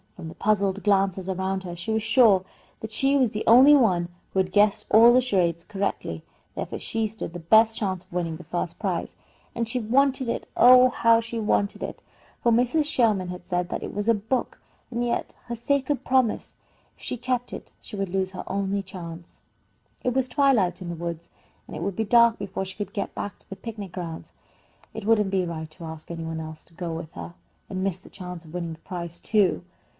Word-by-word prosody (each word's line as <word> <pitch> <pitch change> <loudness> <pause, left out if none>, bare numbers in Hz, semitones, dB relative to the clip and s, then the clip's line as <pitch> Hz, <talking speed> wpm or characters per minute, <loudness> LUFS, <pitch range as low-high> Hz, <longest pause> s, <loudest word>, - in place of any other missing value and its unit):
From 170 -3 -8
the - - -9
puzzled 200 -2 +1
glances 195 -2 +1
around 190 +1 -2
her 175 -2 -6
she 175 +6 -5
was 220 0 +1
sure 220 -5 +5 0.4
that 220 - -7
she 270 +5 +2
was 255 -5 +2
the 210 - -3
only 260 +6 +8
one 180 -10 +3 0.2
who 190 - +1
had 185 -1 +1
guessed 210 +1 +3
all 230 +3 +8
the 255 - +5
charades 175 -8 0
correctly; 200 +1 -3 0.3
therefore - - -4
she 225 0 -2
stood 210 -5 -7
the 175 - -6
best 220 +6 +4
chance 185 -4 -2
of 185 - -21
winning 170 -3 -2
the 175 - -11
first 175 +2 -4
prize, - - -2 0.4
and 235 -1 -1
she 250 +2 -1
wanted 260 +3 +2
it - - -3
oh, 255 +1 +8
how 230 -2 +4
she 230 0 -5
wanted 205 -2 0
it! - - -6 0.4
for 235 - +3
Mrs. 250 +7 +2
Sherman 225 -10 +2
had 180 0 -7
said 180 0 -1
that - - -4
it - - -6
was 205 +1 -2
a - - +7
book. 220 +5 -2 0.3
And 240 0 -1
yet 235 - -2
her 240 -1 -4
sacred 280 +3 0
promise! 255 -4 +1 0.4
If - - -18
she 250 - -3
kept 245 0 -2
it, - - -8
she 215 - -10
would 195 -2 -2
lose 190 0 -1
her 185 - -6
only 200 0 -1
chance. 170 -2 -10 0.6
It 250 - +1
was 260 0 +1
twilight 245 - +2
in 175 - -5
the 170 - -4
woods, 170 0 -6 0.4
and - - -8
it 155 - -4
would 195 0 -2
be 220 - -1
dark 235 +1 +5
before 190 -1 -4
she 185 0 -9
could 205 - -5
get 200 - -3
back 205 - -5
to - - -14
the 195 - -6
picnic 205 -4 -7
grounds. 170 -3 -7 0.6
It 220 -2 -6
wouldn't 210 -3 +3
be 190 -2 +1
right 160 -2 -5
to 170 +2 -11
ask 160 -1 -9
any 165 -1 -5
one 160 0 -4
else 155 0 -8
to 165 - -24
go 170 -1 -4
with 160 0 -6
her, 170 - -8 0.4
and 185 -1 -3
miss 190 -2 -1
the - - -15
chance 180 -2 -8
of 160 - -14
winning 170 -2 -3
the 160 - -13
prize, 170 -1 -6
too. 205 -5 +2
200 Hz, 220 wpm, -25 LUFS, 175-230 Hz, 0.6 s, only